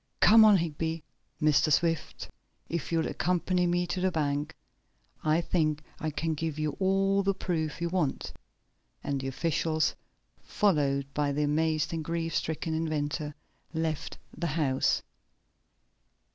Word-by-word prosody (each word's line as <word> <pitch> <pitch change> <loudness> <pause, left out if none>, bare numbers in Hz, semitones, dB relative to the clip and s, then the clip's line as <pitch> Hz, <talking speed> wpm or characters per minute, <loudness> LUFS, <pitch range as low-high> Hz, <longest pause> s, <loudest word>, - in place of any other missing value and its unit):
Come 220 +1 +8
on, 210 -2 +7
Higby! 165 -1 -2 0.4
Mr. 155 0 +3
Swift, 165 +1 0 0.4
if 165 -2 -3
you'll 165 -1 +1
accompany 180 0 0
me 175 +1 +1
to 180 +1 -3
the 185 - +3
bank, 145 -2 -1 0.7
I 155 +2 +3
think 155 -3 0 0.2
I 155 - -2
can 160 +2 -2
give 155 0 -3
you 155 -1 -1
all 195 +1 +2
the 195 0 +1
proof 160 -5 -2
you 170 - -1
want," 170 -6 -1 0.7
and 140 -1 -2
the 135 - -4
officials, 160 +3 0 0.5
followed 145 -8 +1
by 145 0 0
the 150 +2 0
amazed 155 +1 +1
and 160 -1 -2
grief 165 0 -2
stricken 160 +1 -2
inventor, 150 -1 -2 0.4
left 160 -1 -2 0.2
the 170 - -2
house. 145 -4 +1
160 Hz, 135 wpm, -29 LUFS, 150-170 Hz, 0.7 s, Come